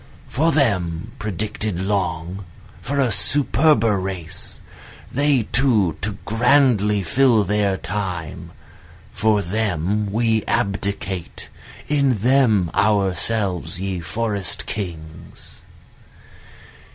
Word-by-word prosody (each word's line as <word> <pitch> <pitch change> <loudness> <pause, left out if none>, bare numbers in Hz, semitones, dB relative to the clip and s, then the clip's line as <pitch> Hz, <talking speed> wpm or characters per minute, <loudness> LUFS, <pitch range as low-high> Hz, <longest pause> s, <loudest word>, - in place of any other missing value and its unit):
For 160 +5 +1
them 100 - 0
predicted 105 -2 -2
long, 95 -2 -2 0.4
For 140 +3 -2
a 130 -3 +3
superber 115 -1 +3
race, 90 -3 -6 0.5
they 140 -2 +2
too 110 - +2
to 100 0 -3
grandly 115 -4 +3
fill 120 +4 +3
their 100 -1 0
time, 90 -2 -5 0.6
For 105 -2 +1
them 100 +1 -1
we 110 0 +1
abdicate, 100 -2 -2 0.4
in 140 -5 +2
them 110 -6 +3
ourselves 100 -3 0
ye 95 -1 -3
forest 100 +3 -2
kings. 80 -6 -8
105 Hz, 90 wpm, -21 LUFS, 90-115 Hz, 0.6 s, a